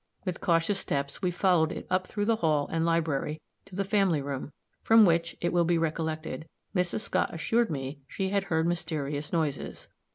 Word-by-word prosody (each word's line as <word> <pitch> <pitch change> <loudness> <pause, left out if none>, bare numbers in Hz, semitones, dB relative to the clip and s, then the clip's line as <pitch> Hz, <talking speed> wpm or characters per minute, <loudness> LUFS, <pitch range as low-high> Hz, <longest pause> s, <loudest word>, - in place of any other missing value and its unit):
With 185 -2 -3
cautious 170 +2 +2
steps 140 -3 -2
we 180 - +2
followed 175 -3 +3
it - - -6
up 185 0 +1
through 205 -1 -2
the 225 0 +2
hall 155 -6 +2
and 165 0 +1
library, 160 -2 0 0.3
to 195 - -12
the 195 - 0
family 195 -5 +2
room, 140 0 -4 0.3
from 225 -1 +7
which, 170 -1 +1
it 175 - 0
will 175 -1 +4
be 170 0 +2
recollected, 160 0 -2 0.3
Mrs. 180 +3 0
Scott 185 -3 0
assured 225 +7 +1
me 140 -1 -4
she 190 +5 -2
had 200 0 0
heard 160 -3 +1
mysterious 155 -4 -2
noises. 155 -5 -2
165 Hz, 185 wpm, -29 LUFS, 155-185 Hz, 0.3 s, from